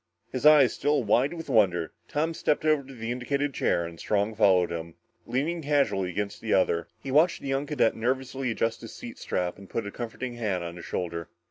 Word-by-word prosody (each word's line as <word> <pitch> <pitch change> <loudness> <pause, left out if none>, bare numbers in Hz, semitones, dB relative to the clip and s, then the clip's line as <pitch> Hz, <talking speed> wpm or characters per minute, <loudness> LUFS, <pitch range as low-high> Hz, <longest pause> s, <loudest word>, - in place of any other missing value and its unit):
His 130 +3 +2
eyes 150 -5 +7
still 145 -1 +1
wide 120 +6 +3
with 165 -1 -7
wonder, 95 - +2 0.2
Tom 160 +3 -1
stepped 150 -1 0
over 155 -2 +4
to 135 0 -12
the 115 0 -4
indicated 140 +3 -1
chair 85 - +1
and 85 0 -9
Strong 105 +1 0
followed 95 -5 +4
him, 85 -1 -5 0.3
leaning 160 +7 -1
casually 140 -11 +1
against 100 +3 -4
the 110 - +1
other. 85 -3 +2 0.2
He 135 - -4
watched 160 +6 +3
the 140 - -4
young 135 +2 0
cadet 140 -6 +2
nervously 130 +2 -1
adjust 115 0 -1
his - - -9
seat - - -9
strap 90 +1 -2
and 100 - -13
put 115 - -2
a 100 - -5
comforting 120 +2 -5
hand 100 -6 -1
on 85 0 -6
his 85 - -9
shoulder. 85 -2 -4
120 Hz, 210 wpm, -27 LUFS, 95-140 Hz, 0.3 s, eyes